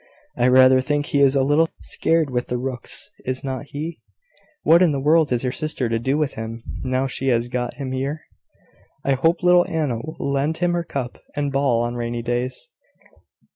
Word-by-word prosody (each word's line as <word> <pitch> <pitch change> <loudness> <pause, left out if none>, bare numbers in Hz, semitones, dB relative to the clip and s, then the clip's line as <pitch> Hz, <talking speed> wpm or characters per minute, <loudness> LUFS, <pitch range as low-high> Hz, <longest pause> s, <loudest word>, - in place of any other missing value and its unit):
I 125 - +2
rather 130 0 +6
think 145 +2 -1
he 140 - +1
is 140 0 +5
a 135 - +3
little 150 +4 +3
scared 160 -4 0
with 125 -1 -1
the 125 - -2
rooks, 125 -1 -4
is 130 0 -3
not 135 0 -4
he? 155 +4 -6 0.6
What 170 +2 +6
in 170 -5 +4
the 140 - -1
world 155 +2 +3
is 125 0 +1
your 125 - 0
sister 145 -4 -1
to 115 0 0
do 130 +5 0
with 150 -2 0
him, 115 +1 -6 0.2
now 130 +1 0
she 135 0 -3
has 120 -1 +1
got 125 -1 -3
him 135 -1 -5
here?" 135 +4 -3 0.8
"I 140 - +2
hope 165 +7 +1
little 180 0 +5
Anna 150 -7 -1
will 155 +7 -8
lend 140 +3 -1
him 175 0 +1
her 175 0 0
cup 130 -6 -5 0.2
and 145 -1 -1
ball 135 -4 +2
on 120 0 -2
rainy 120 0 -3
days." 120 - -3
135 Hz, 200 wpm, -22 LUFS, 125-150 Hz, 0.8 s, rather